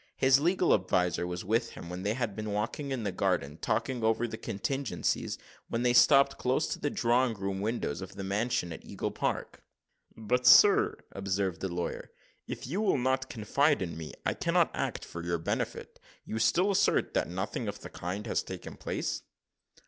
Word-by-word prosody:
His 130 Hz, 0 st, +5 dB
legal 175 Hz, +3 st, +3 dB
adviser 90 Hz, -2 st, +1 dB
was 90 Hz, 0 st, -5 dB
with 115 Hz, +3 st, 0 dB
him, 85 Hz, -, -9 dB
and 90 Hz, +1 st, -5 dB
they 105 Hz, +2 st, 0 dB
had 120 Hz, -5 st, -2 dB
been 110 Hz, -1 st, -4 dB
walking 110 Hz, +7 st, -2 dB
in 130 Hz, -4 st, -2 dB
the 100 Hz, -, -1 dB
garden, 90 Hz, -6 st, -1 dB
talking 125 Hz, -3 st, -1 dB
over 115 Hz, +2 st, +2 dB
the 110 Hz, -, -5 dB
contingencies, 110 Hz, -1 st, -2 dB, 0.3 s
when 115 Hz, +1 st, -1 dB
they 120 Hz, -1 st, +3 dB
stopped 140 Hz, +2 st, +6 dB
close 130 Hz, +5 st, +1 dB
to -, -, -3 dB
the 145 Hz, -, 0 dB
drawing 120 Hz, -1 st, +2 dB
room 95 Hz, -1 st, -3 dB
windows 105 Hz, -7 st, -2 dB
of 95 Hz, -, -8 dB
the 95 Hz, -, -5 dB
mansion 100 Hz, -3 st, -1 dB
at -, -, -10 dB
Eagle -, -, -4 dB
Park. -, -, -3 dB, 0.5 s
"But, 125 Hz, +3 st, 0 dB
sir," 420 Hz, +1 st, +7 dB
observed 95 Hz, -2 st, -2 dB
the 95 Hz, -, -1 dB
lawyer, 85 Hz, 0 st, -4 dB, 0.4 s
"if -, -, -5 dB
you 175 Hz, -, -2 dB
will 205 Hz, -8 st, +2 dB
not 130 Hz, +1 st, 0 dB
confide 130 Hz, +3 st, +1 dB
in 85 Hz, -3 st, -5 dB
me, 80 Hz, -1 st, -7 dB
I -, -, +2 dB
cannot -, -, +2 dB
act -, -, -3 dB
for 85 Hz, -, -7 dB
your 85 Hz, 0 st, 0 dB
benefit. 80 Hz, -, -3 dB, 0.3 s
You 110 Hz, -, -3 dB
still 165 Hz, -, +3 dB
assert 195 Hz, -, +2 dB
that -, -, 0 dB
nothing 95 Hz, +6 st, -3 dB
of 100 Hz, 0 st, -5 dB
the -, -, -8 dB
kind 95 Hz, +5 st, -5 dB
has 110 Hz, -, 0 dB
taken -, -, -8 dB
place?" -, -, -3 dB
110 Hz, 185 wpm, -30 LUFS, 95-130 Hz, 0.5 s, sir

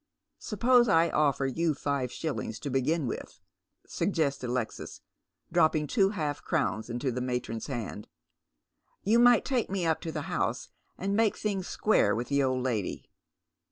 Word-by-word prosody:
" -, -, -56 dB
Suppose 240 Hz, +3 st, +3 dB
I 165 Hz, -3 st, +4 dB
offer 140 Hz, -2 st, +2 dB
you 155 Hz, +4 st, 0 dB
five 140 Hz, -3 st, -1 dB
sliillings 135 Hz, -6 st, -4 dB
to 140 Hz, -, -4 dB
begin 140 Hz, +4 st, +1 dB
with," 120 Hz, -, -6 dB, 0.5 s
suggests 155 Hz, -9 st, -1 dB
Alexis, 125 Hz, -2 st, -4 dB, 0.5 s
dropping 155 Hz, -1 st, +3 dB
two 195 Hz, -, +2 dB
half 155 Hz, -8 st, -3 dB
crowns 135 Hz, -9 st, -1 dB
into 120 Hz, +3 st, -2 dB
the 125 Hz, +1 st, -3 dB
matron's 125 Hz, -3 st, -3 dB
hand. 115 Hz, -5 st, -5 dB, 0.5 s
" -, -, -56 dB, 0.3 s
You 225 Hz, +4 st, +4 dB
might 245 Hz, -1 st, +6 dB
take 255 Hz, -4 st, 0 dB
me 190 Hz, -2 st, -1 dB
up 160 Hz, -1 st, +1 dB
to 165 Hz, -, -4 dB
the -, -, -4 dB
house -, -, -2 dB, 0.3 s
and 200 Hz, +1 st, -1 dB
make 220 Hz, -1 st, +2 dB
things 195 Hz, -4 st, -2 dB
square 215 Hz, -, +2 dB
with 120 Hz, +1 st, -3 dB
th© 140 Hz, 0 st, +2 dB
old 130 Hz, -1 st, 0 dB
lady." 110 Hz, -7 st, -3 dB
150 Hz, 160 wpm, -29 LUFS, 125-195 Hz, 0.5 s, might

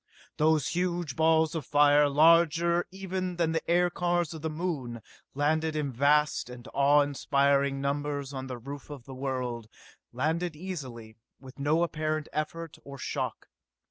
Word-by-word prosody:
Those 155 Hz, -2 st, +2 dB
huge 175 Hz, -5 st, -2 dB
balls 160 Hz, 0 st, +3 dB
of 160 Hz, -3 st, -3 dB
fire, 145 Hz, +1 st, +4 dB
larger 170 Hz, +3 st, +4 dB
even 185 Hz, -1 st, -4 dB
than 170 Hz, -2 st, +1 dB
the 160 Hz, -, 0 dB
aircars 175 Hz, -1 st, +1 dB
of 160 Hz, -, -8 dB
the 160 Hz, -, -2 dB
Moon, 150 Hz, -8 st, -4 dB, 0.3 s
landed 155 Hz, +2 st, +1 dB
in 150 Hz, -3 st, -1 dB
vast 145 Hz, +2 st, +2 dB
and 125 Hz, 0 st, -10 dB
awe 145 Hz, +1 st, +5 dB
inspiring 140 Hz, -1 st, +1 dB
numbers 145 Hz, 0 st, -2 dB
on 130 Hz, -1 st, -5 dB
the 125 Hz, -1 st, -5 dB
roof 140 Hz, +5 st, -9 dB
of 145 Hz, -4 st, -8 dB
the 135 Hz, -, -9 dB
world 130 Hz, -4 st, -3 dB, 0.4 s
landed 160 Hz, +6 st, -1 dB
easily, 130 Hz, -11 st, -7 dB, 0.2 s
with 130 Hz, 0 st, -13 dB
no 155 Hz, +4 st, +2 dB
apparent 155 Hz, -2 st, -2 dB
effort 160 Hz, +2 st, -4 dB
or 140 Hz, 0 st, -9 dB
shock. -, -, -4 dB
150 Hz, 145 wpm, -28 LUFS, 140-165 Hz, 0.4 s, awe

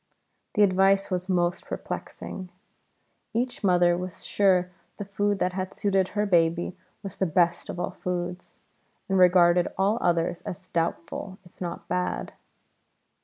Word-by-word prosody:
The 210 Hz, -, +5 dB
advice 195 Hz, 0 st, +3 dB
was 185 Hz, +1 st, -2 dB
most 175 Hz, -1 st, 0 dB
perplexing. 185 Hz, -2 st, -6 dB, 0.9 s
Each 245 Hz, 0 st, -1 dB
mother 175 Hz, -2 st, +4 dB
was 180 Hz, 0 st, -5 dB
sure 185 Hz, -3 st, +2 dB, 0.3 s
the 205 Hz, -, -5 dB
food 205 Hz, +1 st, 0 dB
that 180 Hz, -1 st, 0 dB
had 185 Hz, 0 st, -4 dB
suited 195 Hz, -2 st, +1 dB
her 210 Hz, -, +2 dB
baby 170 Hz, -2 st, +2 dB, 0.3 s
was 195 Hz, -2 st, -7 dB
the 190 Hz, -, +1 dB
best 170 Hz, +1 st, +1 dB
of -, -, -5 dB
all -, -, -2 dB
foods, 180 Hz, 0 st, -5 dB, 0.5 s
and 190 Hz, -1 st, +2 dB
regarded 175 Hz, -1 st, +5 dB
all 200 Hz, +4 st, +2 dB
others 170 Hz, 0 st, +1 dB
as 185 Hz, +1 st, -8 dB
doubtful, 170 Hz, +3 st, -3 dB
if 175 Hz, -, -21 dB
not 175 Hz, -1 st, -5 dB
bad. 180 Hz, 0 st, -2 dB
180 Hz, 140 wpm, -26 LUFS, 175-195 Hz, 0.9 s, The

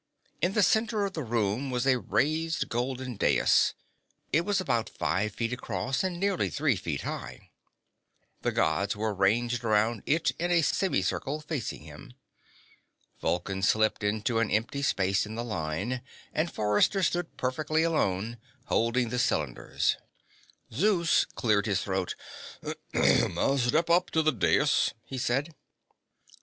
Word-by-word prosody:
In 175 Hz, +4 st, +1 dB
the 210 Hz, -, +3 dB
center 220 Hz, 0 st, +2 dB
of 195 Hz, -, -4 dB
the 160 Hz, -, -3 dB
room 115 Hz, +1 st, -1 dB
was 125 Hz, 0 st, -1 dB
a 130 Hz, -2 st, +3 dB
raised 160 Hz, +6 st, 0 dB
golden 125 Hz, 0 st, -3 dB
dais. -, -, +3 dB, 0.6 s
It 155 Hz, -, +4 dB
was 200 Hz, +2 st, 0 dB
about 120 Hz, -11 st, 0 dB
five 105 Hz, +4 st, -1 dB
feet 115 Hz, +1 st, -2 dB
across 130 Hz, +2 st, -2 dB
and 180 Hz, -2 st, -2 dB
nearly 195 Hz, -1 st, +1 dB
three 145 Hz, -4 st, +1 dB
feet 80 Hz, -7 st, -3 dB
high. -, -, -7 dB, 0.9 s
The -, -, 0 dB
Gods 100 Hz, +1 st, +1 dB
were 110 Hz, 0 st, -1 dB
ranged 115 Hz, +5 st, +1 dB
around 110 Hz, 0 st, +2 dB
it 160 Hz, +2 st, +2 dB
in 175 Hz, +1 st, 0 dB
a 170 Hz, -2 st, +3 dB
semicircle, 155 Hz, -5 st, 0 dB
facing 145 Hz, -, -4 dB
him. 75 Hz, +10 st, -12 dB, 1.0 s
Vulcan 95 Hz, +2 st, -1 dB
slipped 110 Hz, +2 st, +2 dB
into 110 Hz, +3 st, 0 dB
an 115 Hz, -2 st, +1 dB
empty 115 Hz, +6 st, 0 dB
space 100 Hz, -6 st, +1 dB
in 110 Hz, -, -7 dB
the 120 Hz, -, -3 dB
line, 105 Hz, +4 st, -3 dB, 0.3 s
and 160 Hz, +2 st, 0 dB
Forrester 105 Hz, -, +2 dB
stood 175 Hz, 0 st, -1 dB
perfectly 155 Hz, +5 st, 0 dB
alone, 115 Hz, -, 0 dB, 0.3 s
holding 115 Hz, +1 st, +1 dB
the 125 Hz, +1 st, -1 dB
cylinders. 75 Hz, -, 0 dB, 0.8 s
Zeus 170 Hz, -, +3 dB
cleared 105 Hz, -2 st, 0 dB
his 100 Hz, -2 st, 0 dB
throat. 95 Hz, -2 st, -2 dB, 0.8 s
"Step 140 Hz, +5 st, +2 dB
up 175 Hz, -1 st, +2 dB
on 160 Hz, -, +3 dB
the 155 Hz, -, +5 dB
dais," 110 Hz, -, +2 dB
he 130 Hz, +2 st, -5 dB
said. 135 Hz, +7 st, 0 dB
125 Hz, 140 wpm, -28 LUFS, 105-160 Hz, 1.0 s, the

